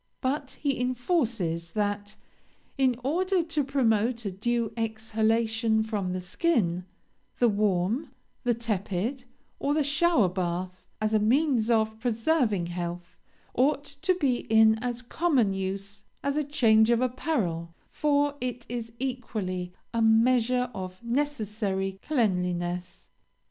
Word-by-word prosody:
But 270 +1 -2
he 275 -4 0
enforces, 235 - -1
that 205 0 -2 0.6
'in 260 -3 +2
order 360 +6 +1
to 320 -3 -1
promote 235 -3 +1
a 200 - -1
due 230 +4 -1
exhalation 225 0 +1
from 205 -4 -2
the 185 - -2
skin, 180 - 0 0.5
the 245 - +4
warm, 210 - +1 0.3
the 240 -1 +2
tepid, 225 +3 -2 0.3
or 285 +1 +1
the 305 - +3
shower 290 - +3
bath, 180 0 -3
as 215 0 0
a 215 - +4
means 240 +1 +2
of 220 -1 +2
preserving 230 - +1
health, 175 0 -5 0.4
ought 280 +3 +2
to 365 +6 -1
be 275 -8 +1
in 220 0 +6
as 245 0 -3
common 255 - +2
use 195 +1 -3 0.2
as 280 0 0
a 300 - +1
change 225 -6 +4
of 235 -1 +4
apparel, 225 - -1 0.2
for 290 -1 +2
it 245 -1 -3
is 235 -1 -5
equally 215 -9 -3 0.2
a 230 - +1
measure 245 +2 +3
of 185 +1 -7
necessary 215 -7 -1
cleanliness.' 180 - -1
225 Hz, 125 wpm, -27 LUFS, 195-260 Hz, 0.6 s, in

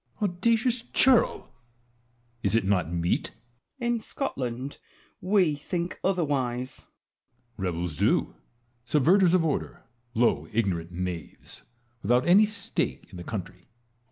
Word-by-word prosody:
Edward. 205 -2 0
Audacious 230 +6 +1
churl! 250 +1 +3 0.9
is - - +1
it 115 - +3
not 90 -4 +1
meet? 85 0 0 0.5
Wallace. 240 -2 0
In 235 - -1
Scotland 130 - -4 0.4
we 185 -5 +3
think 170 +4 -4
otherwise. 135 -8 -1 0.7
Edward. - - -4
Rebels 85 -3 -3
do, - - +2 0.5
subverters 170 - +4
of 170 -3 +2
order, 150 - -3 0.3
low 120 +1 +2
ignorant 90 -7 -1
knaves, 90 -2 -6 0.4
without 125 - +2
any 195 +5 +7
stake 210 - -3
in 95 - -10
the 90 - -7
country. 90 -2 -7
135 Hz, 120 wpm, -27 LUFS, -, 0.9 s, any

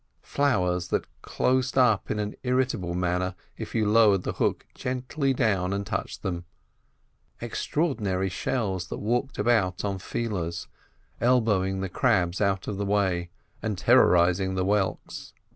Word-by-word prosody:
Flowers 90 -11 +1
that - - -1 0.2
closed 130 0 0
up 120 -6 +3
in - - -1
an 105 0 -2
irritable 125 -9 0
manner 90 +1 -1 0.2
if - - -7
you 110 -2 +2
lowered 105 -3 +5
the - - -2
hook - - -1
gently 130 +3 -2
down 100 -8 +1
and 100 0 -2
touched - - -4
them; 90 -2 -3 1.0
extraordinary 115 - -1
shells 95 -2 -2
that - - -5
walked 120 +6 -1
about 105 -5 +1
on 100 -1 -2
feelers, 90 -6 -3 0.5
elbowing 105 -6 +2
the 95 - -2
crabs 95 -5 +1
out 95 -1 0
of 100 - -3
the 100 - -2
way 95 -4 +1 0.3
and 110 -3 -2
terrorising 95 -4 +4
the 95 - 0
whelks. 100 0 -2
100 Hz, 140 wpm, -26 LUFS, 90-120 Hz, 1.0 s, lowered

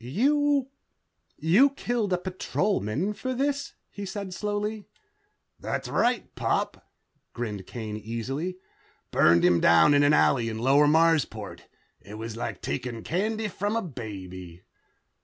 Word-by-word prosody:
"You... 275 - +1 0.7
you 190 - +5
killed 240 -6 -2
a 180 - +3
Patrolman 185 - -1
for 255 +4 -4
this," 280 +2 -1 0.2
he 205 - -7
said 200 -1 -5
slowly. 210 +2 -3 0.7
"That's - - -3
right, 240 -2 0
Pop," - - -2 0.4
grinned 105 -5 -5
Kane 110 -3 -5
easily. 130 - -4 0.5
"Burned 85 +1 +5
him 90 -1 +4
down 85 - +6
in 145 - +5
an 145 0 +5
alley 120 -6 +3
in 110 - -4
Lower 135 +5 +4
Marsport. 160 0 +1 0.3
It 105 - -11
was 110 0 -6
like 115 - -5
taking 115 - -4
candy 215 +5 -1
from 205 +2 -2
a 230 - 0
baby...." 95 - -8
160 Hz, 130 wpm, -27 LUFS, -, 0.7 s, down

